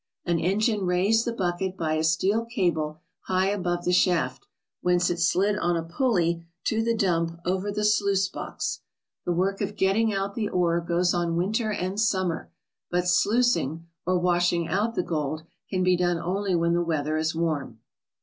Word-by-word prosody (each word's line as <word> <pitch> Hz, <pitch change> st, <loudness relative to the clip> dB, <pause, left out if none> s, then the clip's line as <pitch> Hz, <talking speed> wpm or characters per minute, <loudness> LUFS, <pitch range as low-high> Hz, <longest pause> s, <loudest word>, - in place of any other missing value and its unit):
An 170 Hz, -1 st, +1 dB
engine 200 Hz, +3 st, +1 dB
raised 195 Hz, +6 st, +2 dB
the 235 Hz, -, -1 dB
bucket 190 Hz, -2 st, -2 dB
by 160 Hz, -2 st, -1 dB
a 155 Hz, 0 st, 0 dB
steel 190 Hz, +8 st, +2 dB
cable 170 Hz, -, -1 dB, 0.2 s
high 185 Hz, +1 st, +2 dB
above 175 Hz, -3 st, -2 dB
the 180 Hz, -, +2 dB
shaft, 180 Hz, -, +1 dB, 0.3 s
whence 180 Hz, 0 st, +2 dB
it 175 Hz, -, -2 dB
slid 195 Hz, +4 st, +2 dB
on 175 Hz, -1 st, +1 dB
a 165 Hz, -, -2 dB
pulley 170 Hz, -3 st, 0 dB, 0.2 s
to 220 Hz, 0 st, +1 dB
the 230 Hz, 0 st, +1 dB
dump 170 Hz, -4 st, 0 dB
over 190 Hz, +3 st, -1 dB
the 210 Hz, +1 st, -1 dB
sluice 200 Hz, -2 st, +2 dB
box. -, -, -4 dB, 0.5 s
The -, -, 0 dB
work 190 Hz, +4 st, 0 dB
of 205 Hz, 0 st, -2 dB
getting 210 Hz, +4 st, +2 dB
out 195 Hz, 0 st, -2 dB
the 215 Hz, -2 st, -2 dB
ore 170 Hz, -1 st, +1 dB
goes 175 Hz, +1 st, +1 dB
on 170 Hz, -1 st, 0 dB
winter 215 Hz, +5 st, 0 dB
and 190 Hz, 0 st, -2 dB
summer, 185 Hz, -6 st, 0 dB, 0.4 s
but 180 Hz, 0 st, 0 dB
sluicing, 180 Hz, -, +2 dB, 0.2 s
or 185 Hz, +1 st, +1 dB
washing 175 Hz, -1 st, +1 dB
out 210 Hz, +6 st, 0 dB
the 180 Hz, -, 0 dB
gold, 155 Hz, -1 st, -2 dB, 0.3 s
can 185 Hz, -1 st, 0 dB
be 185 Hz, 0 st, +4 dB
done 175 Hz, -1 st, +1 dB
only 185 Hz, +2 st, -1 dB
when 170 Hz, 0 st, +2 dB
the 175 Hz, -, +2 dB
weather 155 Hz, -2 st, -1 dB
is 160 Hz, 0 st, 0 dB
warm. 155 Hz, -8 st, -2 dB
180 Hz, 180 wpm, -26 LUFS, 170-200 Hz, 0.5 s, be